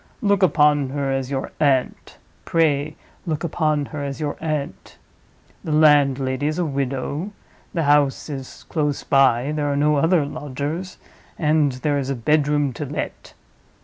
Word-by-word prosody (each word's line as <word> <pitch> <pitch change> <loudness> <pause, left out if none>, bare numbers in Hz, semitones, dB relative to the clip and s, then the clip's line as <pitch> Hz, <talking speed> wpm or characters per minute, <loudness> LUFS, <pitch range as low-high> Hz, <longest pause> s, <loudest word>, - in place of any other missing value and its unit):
Look 200 -1 +2
upon 150 -6 +3
her 140 0 -2
as 135 -1 -2
your 135 -1 -3
aunt; 135 -4 0 0.3
pray 150 -2 +1 0.3
look 155 -1 -2
upon 155 -3 0
her 145 -2 -4
as 140 0 -5
your 150 -2 -2
aunt. 155 -3 -4 0.7
The 160 - -4
landlady 140 -3 +3
is 155 +2 -2
a 180 - 0
widow, 140 +6 -3 0.4
the 165 - -1
house 145 -2 +2
is 135 -4 -8
close 150 -3 -1
by, 135 -1 +3
there 150 -1 -1
are 140 - -1
no 150 +1 +3
other 165 +1 +3
lodgers, 145 +6 -5 0.4
and 150 -3 +2
there 145 +3 -1
is 135 -1 -3
a 135 - -1
bedroom 145 +2 +1
to - - -1
let. 145 - -6
145 Hz, 150 wpm, -22 LUFS, 140-155 Hz, 0.7 s, upon